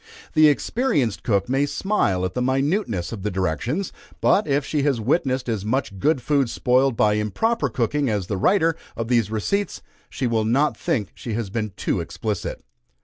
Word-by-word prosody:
The 155 -1 +6
experienced 145 - +1
cook 100 -4 +1
may 135 +3 +1
smile 105 - 0
at 90 - -3
the 125 - -2
minuteness 130 - 0
of 110 -4 -6
the 105 - -1
directions; 105 - -2 0.3
but, 205 - +3
if 140 -1 +1
she 150 - 0
has 140 -4 +1
witnessed 130 +2 0
as 110 -5 -2
much 110 -3 -2
good 145 - +1
food 140 -3 +2
spoiled 125 0 +2
by 105 0 +4
improper 140 - 0
cooking 130 +4 0
as 105 -4 -1
the 100 +2 -3
writer 165 - +3 0.2
of 115 0 -3
these 115 -4 +2
receipts, 195 - -2 0.3
she 130 - -3
will 115 -2 +1
not 135 +7 +2
think 120 - -2
she 115 - -6
has 105 -3 -3
been 110 -1 -2
too - - -1
explicit. - - -4
125 Hz, 180 wpm, -23 LUFS, 105-145 Hz, 0.3 s, The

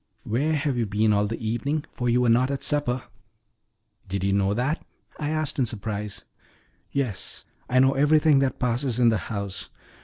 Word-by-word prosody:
"Where 145 +8 0
have 145 -3 0
you 115 -2 0
been 105 +2 +2
all 105 0 +2
the 115 - -3
evening, 140 +7 -1
for 125 -1 -1
you 120 +1 +3
were 125 - +2
not 125 +3 +4
at 140 -1 -3
supper?" 130 -4 +1 1.1
"Did 95 0 -2
you 100 0 +2
know 100 0 +2
that?" 130 +7 -1 0.4
I 150 -1 -2
asked 155 -2 0
in 125 - +2
surprise. 105 -2 -4 0.7
"Yes, 125 -9 -3 0.2
I 130 - +2
know 135 +1 +5
everything 150 +1 +4
that 135 -1 0
passes 125 0 0
in 120 -1 +6
the 110 -3 +1
house. 100 -4 -4
125 Hz, 180 wpm, -25 LUFS, 110-140 Hz, 1.1 s, in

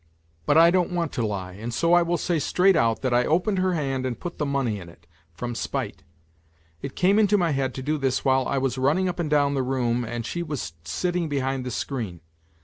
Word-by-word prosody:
But 145 - +4
I 165 +1 +7
don't 180 -1 +2
want 170 -3 -1
to 120 - -2
lie, 95 -3 -4
and 110 +6 -6
so 170 +8 +2
I 175 - +6
will 170 0 0
say 170 -1 0
straight 185 +6 +3
out 115 -2 +1
that 130 -2 +1
I 120 0 +4
opened 185 +7 +1
her 185 0 +1
hand 135 -4 -1
and 130 -2 -3
put 175 - -7
the 150 - 0
money 135 -7 -1
in 85 -2 -10
it... 85 0 -19 0.3
from 120 +7 -4
spite. 120 - -4 0.8
It 135 - -6
came 195 +4 +3
into 210 -1 +4
my 170 -4 +1
head 135 -2 -1
to 130 - -5
do 150 +2 -1
this 135 -2 0
while 130 -1 +3
I - - 0
was 130 -1 -1
running 150 +8 +2
up 180 0 -3
and 165 -3 -1
down 145 -1 +3
the 135 - 0
room 125 -2 0
and 120 0 -4
she 175 - -3
was 150 - -4
sitting 175 - -1
behind 135 -2 -1
the - - -1
screen. 110 - -4
135 Hz, 235 wpm, -25 LUFS, 120-170 Hz, 0.8 s, I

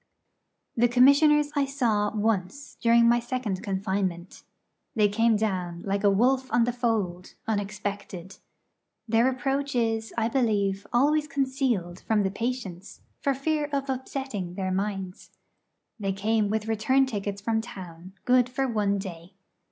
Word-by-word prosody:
The 240 +1 +4
Commissioners 285 +4 +5
I 285 -1 +2
saw 235 -7 0
once 215 +5 -2
during 235 0 +5
my 240 +1 +4
second 240 -6 -3
confinement. 190 -3 -3 0.5
They 210 -2 +4
came 225 +2 +2
down, 180 -5 -2
like 200 0 -1
a 205 - +6
wolf 255 +6 +2
on 240 - +4
the 240 +1 0
fold, 215 -7 -2
unexpected. 200 -3 -4 0.7
Their 230 +3 +3
approach 270 +2 -2
is, 225 -2 0
I 225 -1 +2
believe, 205 -6 0
always 295 +5 +2
concealed 260 - -1
from 215 -2 +1
the 190 - 0
patients, 205 -5 -5 0.2
for 275 -1 0
fear 295 +2 -1
of 275 -1 -1
upsetting 255 -8 -4
their 185 -1 -2
minds. 195 -1 -3 0.7
They 195 -2 -1
came 210 +1 0
with 215 +1 -1
return 225 +5 +2
tickets 205 -5 -4
from 220 +2 0
town, 180 -4 -10
good 250 0 +4
for 265 +1 -1
one 205 -4 0
day. 185 -1 -8
220 Hz, 140 wpm, -26 LUFS, 195-255 Hz, 0.7 s, a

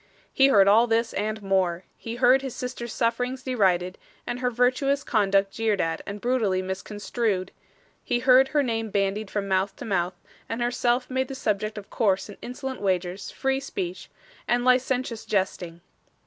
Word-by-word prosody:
He 270 - +5
heard 200 -8 +5
all 225 +4 +6
this 230 0 +1
and 215 +1 -2
more. 190 -2 +1
He 230 0 -7
heard 255 +2 +5
his 265 -3 -6
sister's 250 -2 -5
sufferings 245 +3 -1
derided, 185 -8 +1 0.3
and 240 +1 -3
her 250 -1 +1
virtuous 255 +4 +1
conduct 195 -3 +2
jeered 220 -2 0
at 165 -2 -1
and 200 +1 -5
brutally 215 -6 +1
misconstrued; 195 +1 -2 0.5
he 245 - 0
heard 255 +2 +5
her 290 +1 +1
name 225 -3 -2
bandied 200 +1 -1
from 200 -1 -2
mouth 190 +1 0
to - - -8
mouth, 180 -4 -1 0.3
and 225 - -3
herself 240 +1 +1
made 260 0 -1
the 270 - -6
subject 215 -3 -2
of 205 - -9
coarse 195 -3 +1
and 205 - -11
insolent 260 +1 -6
wagers, 185 -1 -1
free 270 0 -1
speech, 185 -9 -5 0.4
and 245 0 +1
licentious 255 -2 +1
jesting. 180 -4 -2
225 Hz, 165 wpm, -25 LUFS, 195-250 Hz, 0.5 s, all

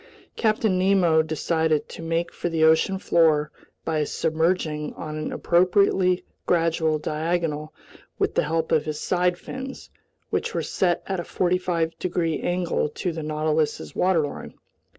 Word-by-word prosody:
Captain 215 -4 +1
Nemo 185 -4 +4
decided 160 0 0
to - - -9
make 165 +1 -2
for 175 - -3
the 165 -1 +1
ocean 160 +4 +4
floor 155 -5 +3 0.3
by 155 -2 0
submerging 160 0 -1
on 155 0 -6
an 155 0 -4
appropriately 185 +1 +2 0.2
gradual 165 -2 +2
diagonal 155 0 -2 0.5
with - - 0
the - - +2
help 160 +1 -1
of 155 -2 +3
his 155 -1 -3
side 180 -1 +1
fins, 265 +7 -8 0.4
which - - -1
were - - 0
set 175 -2 0
at 190 -2 -2
a - - -3
45 175 -2 -1
degrees 170 -3 -1
angle 175 -3 0
to 180 - -3
the 160 0 -5
Nautilus's 155 0 -1
waterline. 165 -6 0
165 Hz, 140 wpm, -24 LUFS, 155-180 Hz, 0.5 s, Nemo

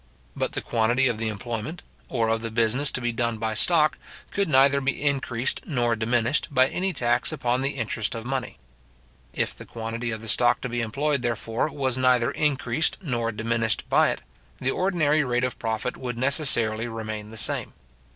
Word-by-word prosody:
But - - -2
the - - -3
quantity 120 +3 +1
of 115 -3 -1
the 115 - -1
employment, 115 - -5 0.3
or 115 -3 0
of 115 0 0
the 115 - -3
business 115 +5 +2
to 125 - -2
be 120 0 0
done 115 -1 -1
by 110 0 -2
stock, 155 +5 +4 0.3
could 200 -3 0
neither 140 0 +4
be 135 0 -1
increased 135 -3 -1
nor 120 -6 +1
diminished 115 +4 +1
by 130 -1 +3
any 190 +1 -1
tax 120 -6 +1
upon 125 +1 0
the 135 +1 -1
interest 115 -3 -2
of 115 0 -6
money. 130 -1 -3 0.7
If - - -2
the - - -10
quantity 115 +1 -5
of 110 -1 -5
the - - -7
stock 120 +3 +4
to 125 - -3
be 120 0 -2
employed, 140 +5 -1
therefore, 115 +2 -1
was 130 -3 -1
neither 125 -2 +3
increased 140 -1 0
nor 120 -7 -1
diminished 115 0 -1
by - - +5
it, - - -3 0.4
the 130 - -1
ordinary 155 -5 +2
rate 125 -1 0
of 125 - -2
profit 115 +2 -2
would 125 -2 -5
necessarily 120 -5 +3
remain 110 -2 -5
the 110 - -10
same. - - 0
120 Hz, 185 wpm, -25 LUFS, 115-135 Hz, 0.7 s, by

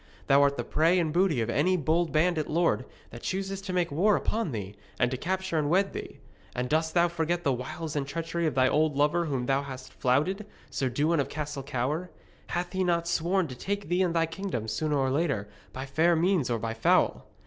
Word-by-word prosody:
Thou 140 +1 +5
art 140 0 +3
the - - -1
prey 165 +4 +2
and 160 -4 0
booty 175 -8 +2
of 115 - -2
any 185 +7 +2
bold 160 +2 +1
bandit 160 0 +1
lord 165 -5 +1 0.3
that 120 - -9
chooses 195 +1 -3
to 195 -1 -5
make 180 -3 0
war 195 +8 +3
upon 220 -8 -1
thee, 100 -4 -5 0.3
and 125 0 +2
to - - -1
capture 185 +3 -1
and 145 -1 0
wed 195 +4 +2
thee. - - -7 0.4
And 125 0 -1
dost 160 +3 0
thou 175 0 +5
forget 170 +1 -1
the 140 - +2
wiles 155 +5 -5
and 140 -2 -1
treachery 165 +2 -2
of 150 - -2
thy 130 -1 +4
old 155 +1 +2
lover 150 +4 +2
whom 135 -5 -2
thou 135 +2 +2
hast 130 -2 -9
flouted, 170 +12 0 0.2
Sir 135 -1 -1
Dewin 150 +6 +1
of 140 - 0
Castle 150 -2 -4
Cower? 145 +6 -2 0.4
Hath 175 +1 -3
he 190 0 +1
not 170 -1 +1
sworn 170 +2 +1
to 130 - -7
take 200 +5 -4
thee 175 +1 +2
and 175 -2 +1
thy 165 0 +3
kingdom, 165 - -4
sooner 150 +6 0
or 135 -1 +1
later, 140 -9 0 0.2
by 130 +1 -6
fair 160 +5 +3
means 170 -4 +2
or 120 - +1
by 115 0 -3
foul? 115 - +2
160 Hz, 220 wpm, -28 LUFS, 135-175 Hz, 0.4 s, Thou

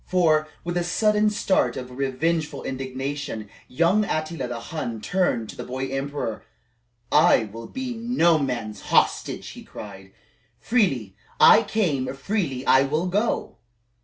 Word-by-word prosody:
For, 155 -4 +3 0.2
with 175 +1 -2
a 175 - +1
sudden 210 +4 +2
start 190 -11 +1
of 125 -1 -7
revengeful 150 +4 -1
indignation, 135 -3 -4 0.2
young 170 +9 +2
Attila 155 -7 -2
the 120 -1 -5
Hun 115 -3 -5
turned 175 - 0
to - - -8
the - - -6
boy 130 +1 -4
emperor: 135 -4 -3 0.7
"I 155 -5 +5
will 115 +2 -8
be 260 -1 -4
no 225 -9 +2
man's 120 -6 -3
hostage," - - +1
he - - -10
cried. 95 0 -10 0.5
"Freely 135 - +1 0.2
I 215 - +8
came, 175 - 0
freely 140 -5 -2 0.2
will 155 +4 0
I - - -7
go! 210 +5 -1
150 Hz, 135 wpm, -24 LUFS, 125-180 Hz, 0.7 s, I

